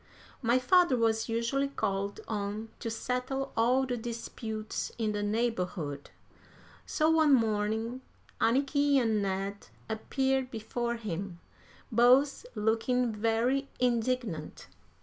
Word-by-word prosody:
My 240 0 +3
father 280 +2 +4
was 225 0 +1
usually 235 +5 0
called 200 -7 -2
on 210 +1 -3
to 230 - -3
settle 250 +4 -2
all 250 +4 +3
the 250 -1 -2
disputes 225 -2 -5
in 220 -2 0
the 205 0 -2
neighborhood; 185 -9 -2 0.8
so 310 0 +2
one 315 -3 +5
morning 220 +2 0 0.4
Anniky 280 +4 +2
and 225 -5 +2
Ned 195 +1 -3 0.2
appeared 265 +4 0
before 235 +1 -3
him, 195 -5 -5 0.5
both 255 - +4
looking 230 +3 +1
very 230 +6 +1
indignant. 240 - -1
230 Hz, 110 wpm, -30 LUFS, 215-255 Hz, 0.8 s, one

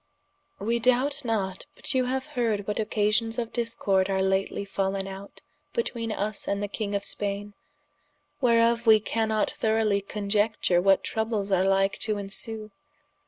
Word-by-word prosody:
] - - -45
_We 230 +4 0
doubt 265 +4 +2
not, 195 -5 -2
but - - -4
you 255 -1 +2
haue 260 +1 0
heard 225 -7 0
what 210 +1 -2
occasions 215 +1 +1
of 235 -2 -3
discorde 200 -5 +1
are 190 0 +1
lately 190 +1 0
fallen 195 0 -1
out 195 +1 -9 0.3
betweene 235 - -2
vs 210 +1 -3
and 200 0 -1
the - - -1
king 205 0 -3
of 200 - -1
Spaine, 205 0 -2 0.9
whereof 235 -1 +3
wee 220 -1 +8
cannot 220 0 0
throughly 220 -2 +1
coniecture 205 -2 +1
what 195 +1 +4
troubles 220 -2 -2
are 185 -1 +3
like 195 0 +2
to 215 -1 +2
ensue. 205 +2 -3
210 Hz, 155 wpm, -27 LUFS, 195-230 Hz, 0.9 s, wee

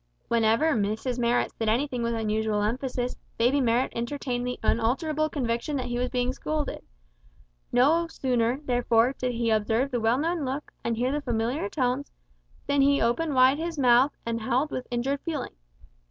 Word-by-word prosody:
Whenever 230 +7 +3
Mrs 220 +3 -1
Marrot 240 0 +1
said 225 -1 -2
anything 250 +2 0
with 235 0 -1
unusual 215 -1 0
emphasis, 250 +2 -2 0.2
baby 250 +5 +3
Marrot 240 +1 +1
entertained 245 0 -3
the 250 - -4
unalterable 300 +8 +1
conviction 245 +1 -2
that 255 -2 -2
he 245 0 -2
was 250 0 -1
being 250 0 0
scolded; 305 +1 -3 0.9
no 305 +8 +3
sooner, 250 -4 0
therefore, 245 -1 +2
did 250 -1 0
he 230 -1 0
observe 220 +5 +1
the 245 - 0
well 225 +3 +3
known 330 +2 -1
look, 270 +3 -4
and 230 -1 -1
hear 250 +3 0
the 295 +1 -1
familiar 235 -1 -1
tones, 260 +1 -1 0.5
than 285 0 +2
he 280 +1 +4
opened 275 +6 0
wide 260 +3 +5
his 330 0 -3
mouth 255 +1 +4
and 230 0 -2
howled 260 +6 0
with 255 - -4
injured 265 +4 -1
feeling. 315 -5 -4
250 Hz, 170 wpm, -26 LUFS, 230-280 Hz, 0.9 s, wide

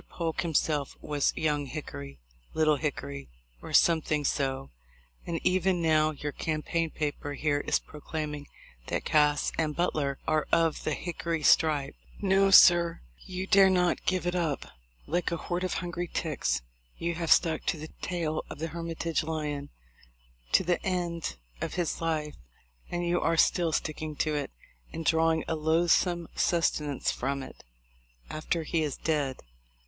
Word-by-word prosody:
Polk 165 -2 -2
himself 155 -3 0
was 145 -2 0
'Young 150 -2 0
Hickory,' 70 - -7 0.4
'Little 155 -2 +3
Hickory,' 70 - -4 0.3
or - - -8
something 155 -3 +3
so; 135 -1 -1 0.6
and 165 -1 -2
even 185 0 +2
now 155 -2 +3
your 145 -1 -4
campaign 160 +2 -1
paper 145 -1 -3
here 145 +1 0
is - - +3
proclaiming 150 -1 -6 0.4
that - - -2
Cass 150 -1 +3
and 155 -2 0
Butler 145 -6 0
are 155 -1 +1
of 165 -2 +2
the 155 - 0
'Hickory 170 -2 -3
stripe.' 145 -3 +4 0.3
No, 195 0 +3
sir, 175 -3 +7 0.3
you 185 0 -4
dare 195 -1 +6
not 180 -1 +1
give 185 -1 +1
it 175 - 0
up. 165 -6 -1 0.4
Like 175 +4 -1
a 170 - -1
horde 175 +2 -3
of 185 - -1
hungry 175 0 -3
ticks, 125 - -1 0.3
you 170 0 -1
have 165 -1 -2
stuck 160 -3 +4
to - - +1
the 155 +1 -8
tail 165 -3 -2
of - - -7
the 165 +2 -3
Hermitage 165 -1 -2
lion 150 -3 -3 0.8
to - - +6
the 175 0 0
end 175 - -2 0.3
of - - -3
his 175 -3 -1
life; 155 -2 -1 0.6
and 175 0 -2
you 175 0 +1
are 165 0 +1
still 170 0 +3
sticking 155 0 -3
to 155 +1 0
it, 145 -1 -2 0.4
and 165 0 -5
drawing 160 0 +3
a - - 0
loathsome 170 +2 +2
sustenance 150 -4 +1
from 135 +1 -2
it, - - -12 0.7
after 160 +2 -2
he 160 +1 0
is 150 -4 -2
dead. 145 -5 -1
160 Hz, 155 wpm, -29 LUFS, 150-170 Hz, 0.8 s, sir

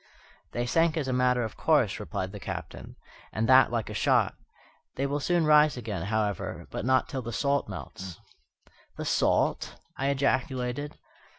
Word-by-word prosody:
"They 120 0 -1
sank 165 +5 +2
as 145 -4 -1
a 130 - 0
matter 125 -1 +2
of 110 - -5
course," - - +2
replied 95 0 -4
the 105 - -8
Captain, - - -7 0.4
"and 110 +1 -1
that 130 -1 +6
like 115 -3 -1
a - - -6
shot. - - +2 0.6
They 135 - -1
will 140 +1 -1
soon 170 +2 +1
rise 150 -2 +5
again, 105 -7 -4
however, 105 -3 -2
but - - -4
not 130 0 +3
till 130 - -4
the 120 -1 -6
salt 140 +3 0
melts." 95 -3 -8 0.8
"The - - -4
salt!" - - +1 0.2
I 135 - -1
ejaculated. 135 0 -1
130 Hz, 165 wpm, -28 LUFS, 115-140 Hz, 0.8 s, that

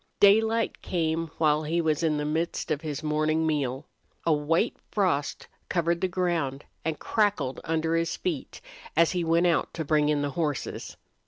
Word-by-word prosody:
Daylight 220 +3 +4
came 165 -1 -1
while 150 -1 +3
he 160 +3 -1
was 160 -1 +1
in 155 -2 +1
the 150 - -2
midst 160 +3 -2
of 150 -1 0
his 155 -2 -4
morning 155 +1 +1
meal. 140 -4 -1 0.4
A 165 - +4
white 160 +8 +1
frost 175 -9 0 0.2
covered 170 0 +1
the 185 - +2
ground 170 -7 -1 0.2
and 160 -1 -1
crackled 200 - 0
under 165 0 0
his 165 0 0
feet 165 -7 -4 0.4
as 165 0 +5
he 180 -2 -1
went 165 +1 +3
out 170 -1 +2
to 160 - -3
bring 150 0 +3
in 145 -1 +1
the 145 - -1
horses. 150 -2 -3
160 Hz, 170 wpm, -27 LUFS, 150-170 Hz, 0.4 s, as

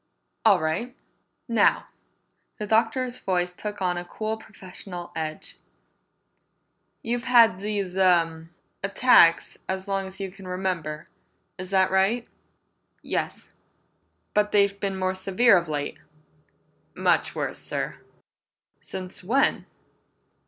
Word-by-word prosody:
"All - - +6
right. 165 +11 -2 0.5
Now," 230 -4 +3 0.7
the 210 - -4
Doctor's 230 +4 +1
voice 180 -1 -1
took 205 +1 -6
on 180 -1 0
a - - -6
cool 215 +5 -4
professional 185 -4 -10
edge, 155 -1 -4 1.5
"you've 240 +2 -2
had 230 -6 +6
these 200 -3 -3
uh 165 -4 +3 0.4
attacks 195 -4 +4
as 190 0 -3
long 195 -1 -1
as 190 - -9
you 195 -1 -4
can 195 0 -12
remember. 180 -5 -3 0.5
Is 185 0 -6
that 190 -1 +3
right?" 195 +5 +2 0.8
"Yes." - - -4 0.8
"But 210 0 +2
they've 200 -1 +3
been 195 -1 -2
more 185 0 0
severe 195 +4 +4
of 170 -3 +1
late?" 145 -1 -3 1.0
"Much - - +1
worse, - - -3
sir!" - - -3 0.8
"Since 185 0 -7
when?" 245 +9 +1
190 Hz, 115 wpm, -25 LUFS, 180-210 Hz, 1.5 s, All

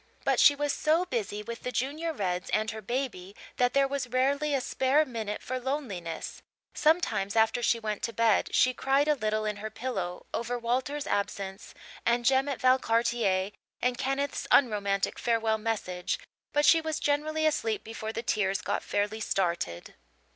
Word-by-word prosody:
But - - +2
she 290 - +7
was 290 0 0
so 320 +4 +2
busy 210 - -3
with 235 +2 -7
the 250 - -3
Junior 295 +7 -2
Reds 180 - -2
and 215 +1 +1
her 220 0 -7
baby 210 -5 -4 0.2
that 245 +1 +2
there 275 0 +4
was 275 -2 -3
rarely 275 +4 +1
a - - +2
spare 265 +4 +2
minute 220 -5 -4
for 255 0 -3
loneliness; 240 - -4 0.3
sometimes, 300 - +1
after 225 +2 +3
she 235 0 +2
went 215 -2 -3
to 230 - -2
bed, 225 -2 +2
she 255 - +4
cried 275 +3 +2
a 300 - +5
little 215 -5 -1
in 210 -1 -2
her 215 +1 -5
pillow 195 -8 -4
over 240 +1 -2
Walter's 260 +5 -1
absence 200 0 -3 0.3
and 235 +1 +1
Jem 270 +2 +3
at 275 - -3
Valcartier 230 -6 +2 0.3
and 250 0 +1
Kenneth's 275 +3 -2
unromantic 205 -6 +2
farewell 225 -2 +1
message, 200 -5 -2 0.3
but 295 0 +2
she 325 +1 +6
was 315 -1 -2
generally 310 +2 0
asleep 230 -8 0
before 220 -1 -5
the 230 +1 -4
tears 195 -4 +1
got - - -2
fairly 205 +2 -1
started. 170 - -2
235 Hz, 170 wpm, -29 LUFS, 210-275 Hz, 0.3 s, she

